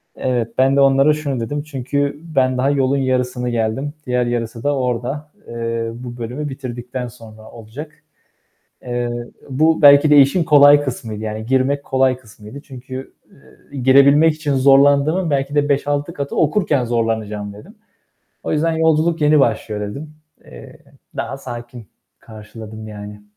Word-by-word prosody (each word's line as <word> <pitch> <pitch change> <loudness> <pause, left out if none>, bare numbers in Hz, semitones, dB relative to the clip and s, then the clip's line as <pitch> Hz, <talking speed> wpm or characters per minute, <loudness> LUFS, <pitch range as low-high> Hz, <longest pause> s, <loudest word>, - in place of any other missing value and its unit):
Evet, 120 -3 -2
ben 135 +1 +3
de 140 - +4
onlara 135 +2 +4
şunu 145 -4 -3
dedim: 145 +6 -3
"Çünkü 140 0 -3 0.2
ben 130 -1 +2
daha 130 +2 +1
yolun 140 -1 +1
yarısını 125 -2 -1
geldim. 120 +5 -2
Diğer 125 -1 0
yarısı 115 -1 -4
da 145 0 +1
orada. 130 +4 -3 0.2
Eee, 115 0 -3
bu 120 0 -9
bölümü 125 +6 -5
bitirdikten 125 -2 -6
sonra 110 -1 -14
olacak." 120 +7 -10 0.9
Eee, 120 -1 -3 0.4
bu 155 +4 +2
belki 145 +1 +7
de 150 - +6
işin 140 +6 +5
kolay 145 -2 +6
kısmıydı, 110 -5 -5
yani 110 0 -5
girmek 135 +3 0
kolay 130 -2 +1
kısmıydı. 110 +2 -13
Çünkü, 130 -1 -9 0.2
ııı, 140 - -22
girebilmek 140 +4 +5
için 150 -2 -2
zorlandığımın 140 +6 +4
belki 140 0 -1
de 145 0 +1
5-6 145 +3 -1
katı 140 -2 -5
okurken 150 -5 +1
zorlanacağım 110 -3 -2
dedim. 175 - -14 0.7
O - - -3
yüzden 165 +2 +1
yolculuk 160 0 +1
yeni 150 0 +4
başlıyor 110 -4 -1
dedim. 140 +10 -7 0.3
Eee, - - -13 0.4
daha 135 - -4
sakin 120 -3 -9 0.3
karşıladım 110 0 -11
yani. 105 0 -10
130 Hz, 145 wpm, -19 LUFS, 115-145 Hz, 0.9 s, belki